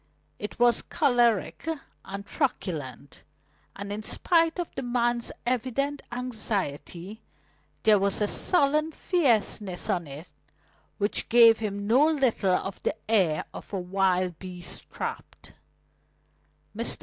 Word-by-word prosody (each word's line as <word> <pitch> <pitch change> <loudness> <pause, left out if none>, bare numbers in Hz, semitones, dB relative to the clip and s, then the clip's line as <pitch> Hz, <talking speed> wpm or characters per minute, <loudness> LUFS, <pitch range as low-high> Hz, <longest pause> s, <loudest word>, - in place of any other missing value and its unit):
It 210 - -6
was 240 -1 +4
choleric 240 - +1 0.4
and 200 +1 -7
truculent, 170 - -3 0.5
and 200 0 -6
in 210 +1 -3
spite 330 - +2
of 350 -2 -4
the - - -4
man's 240 -1 0
evident 260 +4 -1
anxiety, 215 - -4 0.6
there 215 -2 +6
was 200 0 +1
a 210 - +2
sullen 305 - +2
fierceness 220 - +1
on 175 -3 -1
it 145 +5 -9 0.7
which 205 0 -1
gave 230 -1 +7
him 205 -2 -3
no 245 +7 +5
little 255 -11 +2
of 195 +1 -4
the - - -1
air 185 -9 +2
of - - -9
a 195 - -1
wild 185 -1 0
beast 180 -2 -8
trapped. - - -7 1.2
Mr. - - -1
215 Hz, 120 wpm, -27 LUFS, 190-250 Hz, 1.2 s, gave